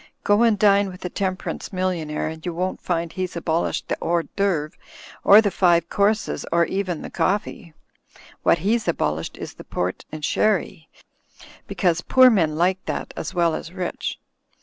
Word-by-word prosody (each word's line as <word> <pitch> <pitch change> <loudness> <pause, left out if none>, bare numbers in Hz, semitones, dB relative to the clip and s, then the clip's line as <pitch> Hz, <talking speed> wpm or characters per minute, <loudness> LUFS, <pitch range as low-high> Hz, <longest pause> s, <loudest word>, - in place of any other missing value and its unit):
Go 205 +2 +3
and 230 -3 +4
dine 200 -1 +4
with 180 0 -10
a 180 - -4
temperance 190 -1 -3
million 185 -4 -2
aire 150 0 -2
and 160 0 -7
you 175 -2 -4
won't 185 +2 -2
find 170 -2 -2
he's 185 -1 -4
abolished 165 0 -1
the - - -1
hors 170 0 +1
d'ceuvres 175 -7 0 0.5
or 205 +2 +8
the 205 -3 0
five 170 -3 +3
courses 210 +2 0
or 170 0 +3
even 185 -4 -3
the - - -8
coffee. 200 -3 -2 0.7
What - - +4
he's 220 0 +1
abolished 80 - -1
is - - -7
the - - -12
port 90 +1 -3
and 155 -1 -4
sherry, 190 -5 0 0.8
because 175 -3 0
poor 255 +5 +6
men 165 -8 +2
like 180 +3 +1
that - - -4
as - - -5
well 170 -2 +2
as 165 - -5
rich. 185 -2 -4
180 Hz, 170 wpm, -23 LUFS, 165-200 Hz, 0.8 s, or